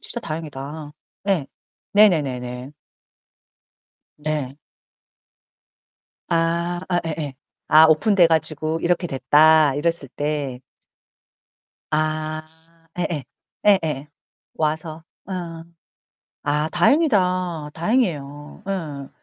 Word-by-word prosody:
진짜 240 - -4
다행이다. 150 -3 -6 0.4
예. 175 -8 +2 0.5
네네네네. 135 -10 +2 1.5
네. 150 -3 -3 1.7
아 170 +1 0 0.2
예예예. 155 -4 -4 0.3
아 155 +1 +8
오픈 160 +7 +3
돼 180 -3 +7
가지고 160 0 0
"이렇게 175 +1 +1
됐다." 150 +1 +5
이랬을 165 -1 -1
때 145 -4 -2 1.3
아 155 0 -1 0.6
예 180 - +1
예 145 -5 -3 0.4
예 205 -2 +7
예 150 -2 -3 0.5
와서. 160 +1 -2 0.2
어. 175 -3 -5 0.8
아 150 +2 +1
다행이다. 180 - +2
다행이에요. 155 - -1
예. 150 -8 -4
155 Hz, 160 characters per minute, -22 LUFS, 145-170 Hz, 1.7 s, 아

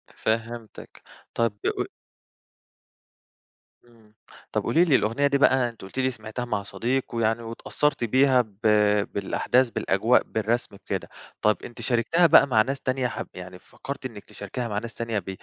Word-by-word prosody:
فهمتك. 115 0 -4 0.3
طب 115 -3 +1
ق - - -1 2.0
إمم، 110 -3 -23 0.4
طب - - -1
قولي 170 +3 +3
لي 145 -6 +4
الأغنية 120 +7 +2
دي 140 0 +2
بقى 130 -3 +4
أنتِ 115 - -15
قلتِ 95 +7 -7
لي 130 0 +2
سمعتها 110 +1 -6
مع 105 -4 -2
صديق، 125 +6 -1
ويعني 115 0 +1
واتأثرتِ 125 +4 -1
بيها 130 +2 +4
ب 105 -3 -14 0.5
بالأحداث 120 +5 +1
بالأجواء، 110 +4 +2
بالرسم 110 0 -2
بكده، - - -5 0.3
طب 105 0 +3
أنتِ 120 0 -9
شاركتيها 130 +9 +3
بقى 140 - +7
مع 110 -4 +4
ناس 135 +4 -2
تانية 130 -1 0
حب - - -5
يعني 90 0 -9
فكرتِ 140 -1 -8
إنك 110 -5 -7
تشاركيها 115 +4 -6
مع 105 -1 -2
ناس 115 0 -8
تانية 115 -3 -2
ب 95 - -9
115 Hz, 155 wpm, -25 LUFS, 110-130 Hz, 2.0 s, بقى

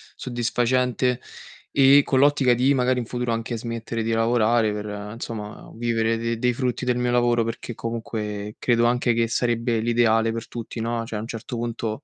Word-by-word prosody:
soddisfacente, 125 +1 0 0.5
e 140 +1 +6
con 130 - +2
l'ottica 140 -3 +4
di 130 +4 +3
magari 125 -1 +2
in 120 - -3
futuro 120 0 -2
anche 115 +1 -3
smettere 115 0 -4
di 115 +1 -1
lavorare 115 -1 +2
per, 105 0 -4 0.3
insomma, 115 -2 -7
vivere 115 -1 0
de 115 0 -2
dei 125 0 +2
frutti 125 0 -2
del 125 -1 +1
mio 125 0 0
lavoro, 120 -1 +3
perché 115 0 -5
comunque 105 -2 -4
credo 120 -1 +2
anche 120 0 +2
che 115 0 +1
sarebbe 115 -1 0
l'ideale 115 -1 +2
per 115 0 -5
tutti, 115 0 -7
no, 115 0 -2
cioè 110 -2 -4
a - - -4
un 115 - -6
certo 120 +2 -6
punto 115 -2 -3
115 Hz, 180 wpm, -24 LUFS, 115-125 Hz, 0.5 s, e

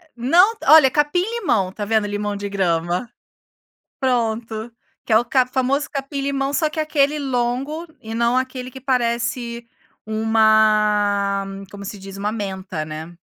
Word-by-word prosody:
Não. 340 - +4
Olha, 300 -2 +8
capim 295 +5 +2
limão, 365 - 0
tá 205 +2 -5
vendo 215 0 +1
limão 205 0 -3
de 200 0 -5
grama. 175 +2 -1 0.9
Pronto, 230 -3 -1 0.3
que - - 0
é 220 +2 +5
ca 255 +1 +2
o - - -16
famoso 265 +3 0
capim 275 0 -4
limão, 275 0 -1
só 310 +2 +1
que 315 - -5
aquele 300 -1 +1
longo 270 +5 -2
e 220 0 -7
não 235 +2 +1
aquele 255 -1 -3
que 265 +1 -11
parece 235 -2 -1 0.4
uma 215 -2 +2 0.3
como 200 0 -9
se 205 - -6
diz, 195 0 -10
uma 205 +2 -2
menta, 190 -6 -4
né. 155 +2 -8
235 Hz, 150 wpm, -21 LUFS, 205-270 Hz, 0.9 s, Olha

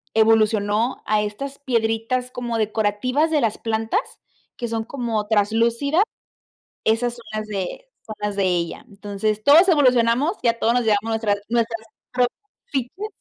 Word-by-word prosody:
evolucionó 220 +1 +2
a 215 0 +2
estas 240 +7 -5
piedritas 235 -1 0
como 240 -2 -3
decorativas 220 +8 0
de 300 - +2
las 225 -3 0
plantas, 225 - 0 0.6
que 240 - -3
son 225 -1 -2
como 230 -4 -3
traslúcidas, 230 - +2 0.8
esas 230 +2 +1
son 235 - -13
las 215 0 -3
de 200 - -4 0.2
son 215 - -7
las 210 -1 -2
de 195 -1 +1
ella. 175 -2 -1
Entonces, 205 +1 -3
todos 315 - +7
evolucionamos, 260 - +3
ya 230 -1 +2
todos 230 - +2
nos 245 - +2
llevamos 210 -2 +2
nuestras 220 -2 +1
nuestras 230 -1 -1 0.3
propias 250 -1 0 0.3
fichas. 280 - -3
225 Hz, 145 wpm, -22 LUFS, 215-250 Hz, 0.8 s, todos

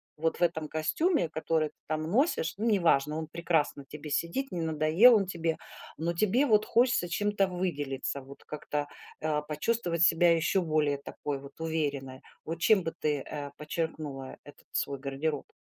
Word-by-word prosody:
Вот 160 +1 -1
в - - +2
этом 160 -3 0
костюме, 170 - +1
который 160 0 0
ты - - -32
там 155 0 -1
носишь. 200 - +1
Ну, 215 - -2
неважно, 155 -7 +3
он 160 -1 -4
прекрасно 160 -3 0
на - - -15
тебе 150 +1 -8
сидит, 170 - -1
не 175 - -2
надоел 160 +9 +5
он 200 -3 +3
тебе. 165 -3 -2 0.4
Но 170 +2 -1
тебе 215 +10 +2
вот 215 -5 +4
хочется 240 -7 +3
чем-то 205 +1 +1
выделиться, 145 -7 -2
вот 135 +1 -13
как-то, 150 -1 -3 0.3
э, 150 -1 0
почувствовать 170 +1 0
себя 170 +1 +6
еще 170 +4 +1
более 155 -4 +1
такой 140 0 -5
вот 140 +3 -13
уверенной. 145 -5 -2 0.2
Вот 165 +1 -4
чем 195 +1 +4
бы 165 - -3
ты, 150 -2 -1
э, 145 -2 -5
подчеркнула 150 -3 -4
этот 145 - -15
свой 140 -1 -1
гардероб? 140 +2 -3
160 Hz, 170 wpm, -29 LUFS, 150-175 Hz, 0.4 s, себя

